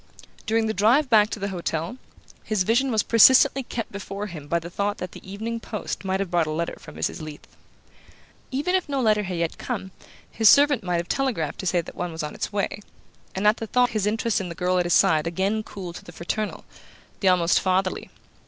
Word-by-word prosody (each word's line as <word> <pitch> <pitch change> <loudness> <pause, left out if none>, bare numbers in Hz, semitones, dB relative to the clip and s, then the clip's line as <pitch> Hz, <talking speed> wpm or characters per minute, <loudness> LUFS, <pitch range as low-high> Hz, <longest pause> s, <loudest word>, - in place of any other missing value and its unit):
During 225 0 +2
the 220 - -1
drive 245 +8 +3
back 215 -1 +6
to - - -4
the 200 -1 -3
hotel 170 +3 -3 0.5
this 215 -4 +2
vision 240 +7 +2
was 220 -4 +2
persistently 260 +4 +6
kept 235 -3 -5
before 200 0 -5
him 160 -7 -8
by 170 - +1
the 170 +1 -6
thought 205 +2 -1
that 180 -1 -6
the 190 - -11
evening 225 +3 -4
post 215 -2 -5
might 190 0 -1
have 195 -3 -3
brought 170 -3 +2
a - - -2
letter 165 +2 -2
from - - -13
Mrs. - - -3
Leath. 155 -1 -9 1.0
Even 290 +7 -1
if 370 -4 0
no 280 -1 -1
letter 215 -4 +3
had 185 -3 -4
yet 170 -1 -2
come, 190 - -4 0.4
his 220 -2 +5
servant 285 -5 +5
might 180 -1 0
have 170 +1 -3
telegraphed 235 - -1
to 190 - -3
say 175 -1 +2
that - - -11
one 175 -1 -4
was 160 -1 -5
on 150 - -5
its - - -4
way; 205 0 -2 0.5
and 190 +2 -2
at 210 +2 +5
the 225 - -5
thought 245 +2 +2
his 215 -2 0
interest 220 0 0
in 185 - -5
the 170 - -7
girl 180 +1 +1
at 175 - 0
his 175 - +2
side 155 0 +3
again 195 +6 0
cooled 185 -5 -8
to - - -12
the - - -11
fraternal, 205 +5 -4 0.5
the 195 - 0
almost 175 -2 +3
fatherly. 185 0 0
200 Hz, 225 wpm, -24 LUFS, 175-225 Hz, 1.0 s, back